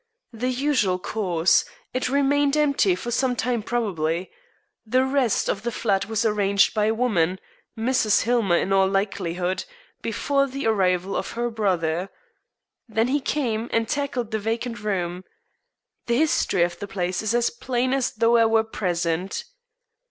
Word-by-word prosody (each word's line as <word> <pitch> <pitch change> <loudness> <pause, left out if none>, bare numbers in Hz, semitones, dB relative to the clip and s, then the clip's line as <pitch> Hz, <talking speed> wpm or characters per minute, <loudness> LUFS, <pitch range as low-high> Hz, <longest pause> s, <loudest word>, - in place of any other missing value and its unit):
"The 245 +3 -2
usual 255 -8 +1
course. 180 -4 +1 0.3
It 255 0 -1
remained 285 +1 +2
empty 280 -11 +3
for 240 +6 -5
some 250 +1 +1
time 240 -1 -1
probably. 185 -7 -2 0.5
The 255 +4 +2
rest 265 -4 +1
of 195 - -1
the 235 +2 -2
flat 200 -4 0
was 225 +1 -1
arranged 200 -2 +3
by 210 -1 +1
a 220 - +2
woman 190 -7 +1 0.4
Mrs. 225 -2 +2
Hillmer 225 -7 +2
in 195 - 0
all 190 0 +4
likelihood 190 -2 -1 0.4
before 275 -1 0
the 275 0 -5
arrival 190 -3 +1
of - - -3
her 240 0 -2
brother. 185 -4 0 0.8
Then 225 +2 +1
he 285 +2 +2
came 240 -5 -1
and 230 0 +1
tackled 255 -5 -2
the 220 - -1
vacant 230 +2 -3
room. 185 -4 -2 0.8
The 235 0 +2
history 260 - +2
of 175 0 -2
the 200 - -5
place 180 -2 -2
is 220 +2 0
as 240 0 +2
plain 250 +1 -1
as 270 -2 +1
though 230 +2 +3
I 230 - +5
were 225 0 +3
present. 180 -4 -2
220 Hz, 155 wpm, -24 LUFS, 190-245 Hz, 0.8 s, I